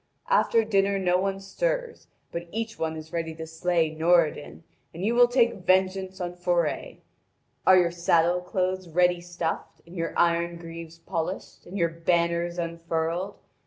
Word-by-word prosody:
After 230 Hz, -, +4 dB
dinner 200 Hz, -2 st, +2 dB
no 180 Hz, -1 st, +2 dB
one 195 Hz, 0 st, -1 dB
stirs, -, -, -3 dB, 0.2 s
but 170 Hz, 0 st, -5 dB
each 225 Hz, 0 st, -4 dB
one 160 Hz, 0 st, -2 dB
is 155 Hz, 0 st, -10 dB
ready 165 Hz, -1 st, -3 dB
to 160 Hz, 0 st, -6 dB
slay 160 Hz, 0 st, 0 dB
Noradin, 165 Hz, -1 st, +1 dB, 0.3 s
and 180 Hz, +4 st, -3 dB
you 230 Hz, -, +2 dB
will 245 Hz, 0 st, +6 dB
take 240 Hz, -1 st, +3 dB
vengeance 190 Hz, +1 st, +1 dB
on 175 Hz, -1 st, -3 dB
Forre! 175 Hz, -3 st, -1 dB, 0.7 s
Are 185 Hz, 0 st, +8 dB
your 175 Hz, -2 st, +3 dB
saddle 170 Hz, 0 st, +2 dB
cloths 185 Hz, 0 st, -2 dB
ready 175 Hz, +1 st, +2 dB
stuffed, 175 Hz, -2 st, -4 dB
and 170 Hz, +2 st, -13 dB
your 165 Hz, -1 st, -3 dB
iron 170 Hz, 0 st, +2 dB
greaves 165 Hz, -1 st, -9 dB
polished, 165 Hz, +2 st, -5 dB
and 190 Hz, -, -6 dB
your 170 Hz, -3 st, +2 dB
banners 170 Hz, +1 st, 0 dB
unfurled? 170 Hz, +2 st, -2 dB
175 Hz, 155 wpm, -26 LUFS, 165-190 Hz, 0.7 s, Are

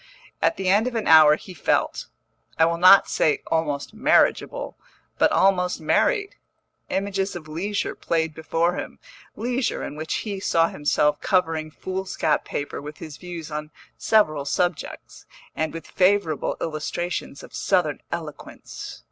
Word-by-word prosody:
At 330 Hz, -, +2 dB
the 190 Hz, -, -3 dB
end 205 Hz, +5 st, +4 dB
of 250 Hz, -, -4 dB
an 225 Hz, -, -1 dB
hour 155 Hz, -2 st, +8 dB
he 185 Hz, -, -11 dB
felt, 150 Hz, -, 0 dB, 0.5 s
I 160 Hz, -, +5 dB
will 170 Hz, 0 st, 0 dB
not 185 Hz, +2 st, +8 dB
say 150 Hz, -, +1 dB
almost 150 Hz, 0 st, -1 dB
marriageable, 245 Hz, -, +1 dB, 0.4 s
but -, -, +4 dB
almost 180 Hz, -2 st, +2 dB
married. 410 Hz, -, +1 dB, 0.5 s
Images 195 Hz, 0 st, -1 dB
of 160 Hz, -3 st, -8 dB
leisure 195 Hz, +7 st, -2 dB
played 160 Hz, -2 st, -1 dB
before 165 Hz, +3 st, 0 dB
him, -, -, -6 dB, 0.4 s
leisure 245 Hz, +3 st, -2 dB
in 145 Hz, -, -6 dB
which 155 Hz, +1 st, -3 dB
he 200 Hz, -3 st, -4 dB
saw 165 Hz, -3 st, +2 dB
himself 150 Hz, 0 st, +1 dB
covering 165 Hz, -4 st, 0 dB
foolscap 185 Hz, -2 st, -2 dB
paper 145 Hz, -, -4 dB
with 150 Hz, +1 st, -9 dB
his 155 Hz, -3 st, -9 dB
views 170 Hz, -3 st, -8 dB
on 150 Hz, 0 st, -5 dB, 0.3 s
several 155 Hz, -10 st, +2 dB
subjects, 175 Hz, +3 st, -3 dB, 0.3 s
and 160 Hz, -1 st, -1 dB
with 165 Hz, -, -8 dB
favourable 185 Hz, -5 st, +1 dB
illustrations 160 Hz, -1 st, -4 dB
of -, -, -13 dB
Southern 175 Hz, -7 st, 0 dB
eloquence. 160 Hz, -3 st, -7 dB
170 Hz, 140 wpm, -24 LUFS, 155-195 Hz, 0.5 s, hour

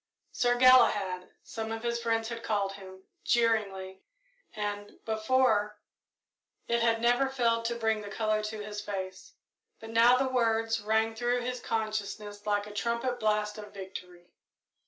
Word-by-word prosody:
"Sir 245 Hz, 0 st, +2 dB
Galahad," 220 Hz, -8 st, +5 dB
some 225 Hz, 0 st, -5 dB
of 225 Hz, 0 st, -5 dB
his 235 Hz, 0 st, -1 dB
friends 225 Hz, -1 st, 0 dB
had 230 Hz, -1 st, -5 dB
called 205 Hz, -3 st, 0 dB
him, 190 Hz, -1 st, -12 dB, 0.2 s
jeeringly, 200 Hz, -5 st, 0 dB, 0.5 s
and, 205 Hz, -1 st, -4 dB
before, 220 Hz, -2 st, +1 dB, 0.9 s
it 235 Hz, 0 st, +1 dB
had 230 Hz, -1 st, +2 dB
never 245 Hz, +3 st, +3 dB
failed 230 Hz, -3 st, +1 dB
to 235 Hz, +1 st, -1 dB
bring 220 Hz, -2 st, 0 dB
the 205 Hz, -, -8 dB
colour 215 Hz, +1 st, 0 dB
to 215 Hz, 0 st, -5 dB
his 210 Hz, -1 st, -5 dB
face; 190 Hz, -2 st, -6 dB, 0.4 s
but 225 Hz, 0 st, -9 dB
now 235 Hz, +2 st, +6 dB
the 265 Hz, +1 st, +1 dB
words 225 Hz, -3 st, +1 dB
rang 220 Hz, +1 st, +1 dB
through 240 Hz, +2 st, 0 dB
his 250 Hz, +1 st, -3 dB
consciousness 215 Hz, -2 st, -4 dB
like 205 Hz, 0 st, +1 dB
a 210 Hz, -, -10 dB
trumpet 235 Hz, +3 st, -1 dB
blast 210 Hz, 0 st, 0 dB
of 210 Hz, -1 st, -11 dB
victory. 180 Hz, -2 st, -9 dB
220 Hz, 150 wpm, -29 LUFS, 205-235 Hz, 0.9 s, now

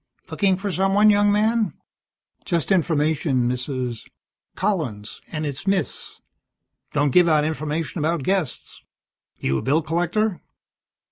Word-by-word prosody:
"Looking 195 Hz, -2 st, +2 dB
for 200 Hz, +1 st, -3 dB
someone, 195 Hz, +3 st, +4 dB
young 205 Hz, 0 st, +4 dB
man?" 215 Hz, -3 st, +1 dB, 0.7 s
"Just 170 Hz, +1 st, -1 dB
information, 155 Hz, -7 st, +1 dB
Mrs. 125 Hz, -1 st, -3 dB, 0.2 s
" -, -, -60 dB
"Collins, 155 Hz, -, -2 dB
and 155 Hz, -1 st, -3 dB
it's 145 Hz, +5 st, -5 dB
Miss. 195 Hz, -1 st, -2 dB, 0.7 s
Don't 145 Hz, -1 st, +1 dB
give 180 Hz, -1 st, +6 dB
out 150 Hz, -1 st, +3 dB
information 155 Hz, +1 st, -3 dB
about 160 Hz, 0 st, 0 dB
guests. 185 Hz, -6 st, -2 dB, 0.6 s
You 65 Hz, 0 st, -1 dB
a -, -, -5 dB
bill 150 Hz, +5 st, +1 dB
collector?" 175 Hz, +3 st, 0 dB
165 Hz, 125 wpm, -23 LUFS, 145-195 Hz, 0.7 s, give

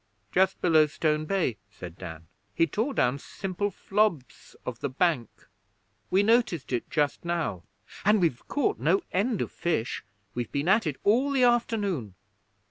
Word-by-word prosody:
'Just 190 Hz, +1 st, +2 dB
below 160 Hz, -3 st, +5 dB
Stone 150 Hz, 0 st, 0 dB
Bay,' 170 Hz, -, 0 dB
said 90 Hz, -4 st, -10 dB
Dan. 80 Hz, -2 st, -9 dB, 0.3 s
'He 165 Hz, -, +4 dB
tore 225 Hz, -, -2 dB
down 125 Hz, +3 st, +2 dB
simple 195 Hz, +6 st, -3 dB
flobs 195 Hz, -7 st, -1 dB
of 120 Hz, -2 st, -5 dB
the 140 Hz, -, -2 dB
bank! 135 Hz, -, +1 dB, 0.8 s
We 195 Hz, +2 st, +3 dB
noticed 220 Hz, -, +2 dB
it 120 Hz, -, -2 dB
just 145 Hz, -2 st, 0 dB
now. 170 Hz, -, -2 dB, 0.4 s
And 210 Hz, +1 st, +4 dB
we've 160 Hz, -9 st, 0 dB
caught 400 Hz, +9 st, 0 dB
no 390 Hz, -, +2 dB
end 210 Hz, +3 st, +1 dB
of -, -, -7 dB
fish. 145 Hz, -9 st, -2 dB, 0.3 s
We've 120 Hz, -3 st, -4 dB
been 140 Hz, +3 st, -1 dB
at 205 Hz, -1 st, +4 dB
it 150 Hz, -, -1 dB
all 245 Hz, +7 st, +3 dB
the 270 Hz, -2 st, +2 dB
afternoon.' 205 Hz, -, +1 dB
170 Hz, 155 wpm, -27 LUFS, 130-210 Hz, 0.8 s, below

